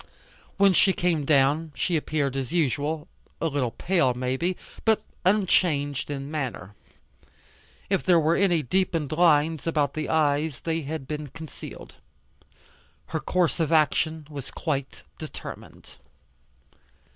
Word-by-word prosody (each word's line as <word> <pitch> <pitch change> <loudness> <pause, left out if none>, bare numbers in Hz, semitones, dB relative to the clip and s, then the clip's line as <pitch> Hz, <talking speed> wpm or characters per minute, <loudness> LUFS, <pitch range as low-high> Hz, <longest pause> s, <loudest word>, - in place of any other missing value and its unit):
When 200 -1 +5
she 190 +2 +4
came 170 -6 0
down 145 +2 +2
she 170 +8 0
appeared 145 -3 -1
as 135 0 -3
usual, 155 0 0 0.3
a - - -2
little 140 -6 0
pale 150 -2 +1
may 125 +1 -1
be, 175 +6 -1 0.3
but 220 -1 +3 0.2
unchanged 170 -8 +2
in 140 0 -5
manner. 125 - -4 1.1
If 195 -1 0
there 175 -2 +5
were 160 +1 +2
any 175 -5 +2
deepened 165 0 0
lines 160 -1 +3
about 150 -4 +1
the 155 -1 -3
eyes 150 -2 +1
they 165 0 -1
had 150 -2 -5
been 150 0 -4
concealed. 160 +3 -10 1.2
Her 160 - -1
course 175 -3 0
of 160 -2 +1
action 160 0 +2
was 140 -4 -8
quite 140 -5 -3 0.2
determined. - - -9
155 Hz, 130 wpm, -26 LUFS, 140-170 Hz, 1.2 s, When